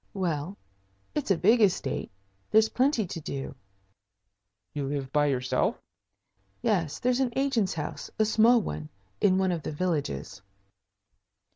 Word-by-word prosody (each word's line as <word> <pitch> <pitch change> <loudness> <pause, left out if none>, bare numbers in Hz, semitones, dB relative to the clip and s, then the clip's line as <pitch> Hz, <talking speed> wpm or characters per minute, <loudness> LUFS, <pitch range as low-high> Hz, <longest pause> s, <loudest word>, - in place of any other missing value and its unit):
"Well, 175 0 -2 0.6
it's 295 - -2
a 195 - +4
big 225 +7 +4
estate. 180 -9 +1 0.4
There's 220 0 +5
plenty 255 -4 +2
to 165 -2 -6
do." 135 -3 -5 1.2
"You 145 -2 -3
live 135 -1 -4
by 145 0 +3
yourself?" 130 -2 0 0.8
"Yes. 170 -8 +1
There's 250 +1 +1
an 260 -3 +1
agent's 265 -9 +1
house 150 -2 -5
a 215 - +3
small 225 +3 +5
one 75 - -5 0.3
in 190 -2 +4
one 190 -1 +2
of 170 -2 -2
the - - -4
villages." 145 - -2
180 Hz, 135 wpm, -28 LUFS, 145-220 Hz, 1.2 s, There's